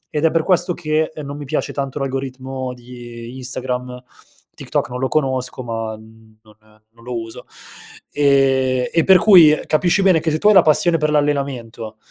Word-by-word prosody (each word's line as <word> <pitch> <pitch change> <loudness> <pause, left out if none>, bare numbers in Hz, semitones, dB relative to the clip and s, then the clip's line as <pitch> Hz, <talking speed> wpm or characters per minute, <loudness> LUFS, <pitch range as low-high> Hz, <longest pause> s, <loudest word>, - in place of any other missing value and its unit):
Ed 150 - +1
è 160 - +3
per 165 -1 0
questo 180 -1 +1
che, 155 -1 -1
non 140 +1 -7
mi 145 - -8
piace 145 +3 -3
tanto 135 -1 -4
l'algoritmo 130 -1 -5
di 120 -1 -11
Instagram, 125 0 -4 0.5
TikTok - - -3
non 125 0 -6
lo 130 - 0
conosco 130 -3 -2
ma, 115 -2 -5
mhmm, 110 0 -19
non 105 -1 -21 0.4
non 115 +1 -21
lo 125 -1 -4
uso, 115 0 -10 0.7
e 135 -3 +1
e 165 - +3
per 190 -1 +6
cui 170 -6 +6
capisci 175 +5 +1
bene 185 -4 +4
che 160 +1 -2
se 155 - 0
tu 205 - +1
hai - - +6
la 190 - +7
passione 165 +2 +3
per 155 0 0
l'allenamento, 135 -7 -2
135 Hz, 180 wpm, -19 LUFS, 125-155 Hz, 0.7 s, la